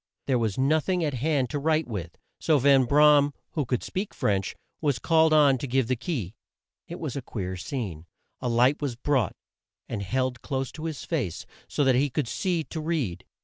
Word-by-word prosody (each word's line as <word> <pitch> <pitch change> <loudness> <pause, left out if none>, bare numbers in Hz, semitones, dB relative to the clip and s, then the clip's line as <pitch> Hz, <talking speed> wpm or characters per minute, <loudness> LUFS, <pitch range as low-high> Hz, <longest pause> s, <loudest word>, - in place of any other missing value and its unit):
There 130 -3 +2
was 110 -4 -1
no 140 +4 +3
thing 180 +2 -1
at 150 -3 0
hand 135 0 0
to 145 - -1
write 155 +1 +1
with, 90 -7 -6 0.2
so 155 - +3
Van 135 -1 +5
Bra 150 +3 +6
am, 145 0 0 0.2
who 150 -4 -1
could 125 -1 -1
speak 195 +2 -4
French, 95 -2 0 0.3
was 145 -5 +1
called 160 +6 +3
on 145 -4 +5
to 140 - -4
give 130 0 +1
the 130 - +1
key. 120 - -4 0.5
It 170 - -7
was 150 -6 -4
a 140 - -3
queer 95 -6 -5
scene. 90 - -5 0.3
A 125 - -2
light 125 +6 +3
was 140 -5 -2
brought, 130 0 0 0.5
and 110 -4 -4
held 125 +4 -1
close 135 -2 -3
to 160 - -8
his 160 -3 -4
face 130 - -2 0.2
so 145 - 0
that 135 -1 +4
he 140 +3 +2
could 140 -1 -2
see 175 +5 -1
to 160 +1 -6
read. 150 - -2
135 Hz, 205 wpm, -26 LUFS, 120-155 Hz, 0.5 s, Bra